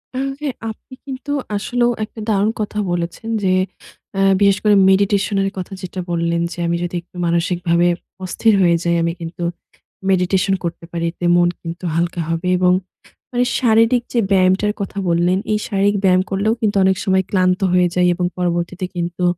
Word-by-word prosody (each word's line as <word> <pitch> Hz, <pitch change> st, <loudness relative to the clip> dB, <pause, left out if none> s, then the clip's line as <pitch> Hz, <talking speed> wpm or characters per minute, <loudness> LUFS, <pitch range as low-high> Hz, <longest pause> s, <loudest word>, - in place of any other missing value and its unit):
আর 260 Hz, -, -1 dB, 0.2 s
হ্যাঁ, 285 Hz, -4 st, -3 dB
আপনি 220 Hz, +4 st, -11 dB
কিন্তু 270 Hz, +1 st, -6 dB, 0.2 s
আসলেও 240 Hz, +4 st, +1 dB
একটা 215 Hz, +1 st, -8 dB
দারুণ 210 Hz, 0 st, +2 dB
কথা 210 Hz, 0 st, -3 dB
বলেছেন 175 Hz, +5 st, -3 dB
যে, 185 Hz, -, +3 dB, 0.6 s
অ্যা 195 Hz, 0 st, +3 dB
বিশেষ 200 Hz, -1 st, +4 dB
করে 210 Hz, -1 st, +5 dB
মেডিটেশনের 195 Hz, 0 st, +2 dB
কথা 185 Hz, +1 st, -5 dB
যেটা 185 Hz, 0 st, -6 dB
বললেন 170 Hz, 0 st, 0 dB
যে, -, -, -8 dB
আমি 170 Hz, -, +1 dB
যদি 175 Hz, 0 st, -4 dB
একটু 175 Hz, +1 st, -30 dB
মানসিকভাবে 170 Hz, 0 st, +1 dB, 0.4 s
অস্থির 220 Hz, +4 st, +2 dB
হয়ে 170 Hz, -2 st, +4 dB
যাই, 170 Hz, 0 st, +1 dB
আমি 170 Hz, -, +1 dB
কিন্তু 165 Hz, +1 st, -6 dB, 0.7 s
মেডিটেশন 190 Hz, +1 st, +2 dB
করতে 170 Hz, 0 st, -4 dB
পারি। 170 Hz, -1 st, -2 dB
এতে 175 Hz, -, -6 dB
মন 175 Hz, 0 st, +4 dB
কিন্তু 170 Hz, +1 st, -7 dB
হালকা 170 Hz, +1 st, 0 dB
হবে 165 Hz, +2 st, -2 dB
এবং 180 Hz, 0 st, +4 dB, 0.6 s
মানে 245 Hz, 0 st, +1 dB, 0.2 s
শারীরিক 230 Hz, +1 st, +3 dB
যে 240 Hz, -, +2 dB
ব্যায়ামটার 190 Hz, +2 st, +3 dB
কথা 200 Hz, +1 st, -5 dB
বললেন, 175 Hz, +2 st, +2 dB
এই 210 Hz, -, +1 dB
শারীরিক 200 Hz, +1 st, +1 dB
ব্যায়াম 185 Hz, -1 st, +4 dB
করলেও 200 Hz, +3 st, +1 dB
কিন্তু 210 Hz, -2 st, +1 dB
অনেক 190 Hz, 0 st, +3 dB
সময় 190 Hz, -1 st, +2 dB
ক্লান্ত 185 Hz, -1 st, +2 dB
হয়ে 180 Hz, -1 st, +4 dB
যাই 180 Hz, 0 st, +3 dB
এবং 180 Hz, -, -1 dB
পরবর্তীতে 175 Hz, +1 st, -1 dB
কিন্তু 175 Hz, +1 st, -3 dB
185 Hz, 170 wpm, -19 LUFS, 175-205 Hz, 0.7 s, করে